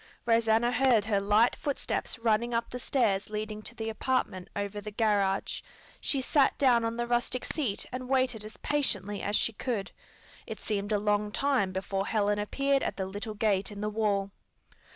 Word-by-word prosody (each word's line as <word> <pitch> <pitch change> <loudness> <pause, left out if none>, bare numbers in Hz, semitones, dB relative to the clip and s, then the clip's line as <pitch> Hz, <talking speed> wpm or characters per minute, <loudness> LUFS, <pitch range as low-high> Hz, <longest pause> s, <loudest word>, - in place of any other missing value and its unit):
Rosanna 230 0 +3
heard 245 -4 +3
her 205 -2 +1
light 210 +4 +4
footsteps 285 -2 -2
running 230 +1 +1
up 230 0 -1
the 250 - -5
stairs 215 -7 +1
leading 215 0 -4
to 235 - -8
the 225 -1 -4
apartment 220 -5 -1
over 205 0 -3
the 210 - -6
garage. 205 -3 +1 0.4
She 275 - 0
sat 275 +1 +3
down 245 -4 +4
on 230 0 -2
the 240 - 0
rustic 240 +1 0
seat 250 -11 -1
and 255 0 -5
waited 255 -5 +1
as 215 0 -10
patiently 205 -9 0
as 205 - 0
she 230 - +1
could. 210 -3 -3 0.6
It - - -6
seemed 205 -1 -2
a 210 - +3
long 210 0 +1
time 260 -7 +1
before 195 +1 -2
Helen 205 -1 +1
appeared 275 +6 +1
at - - -2
the 190 - -1
little 205 +3 -5
gate 205 -2 +1
in 205 0 -7
the 210 - -1
wall. 205 -2 0
215 Hz, 180 wpm, -29 LUFS, 205-240 Hz, 0.6 s, light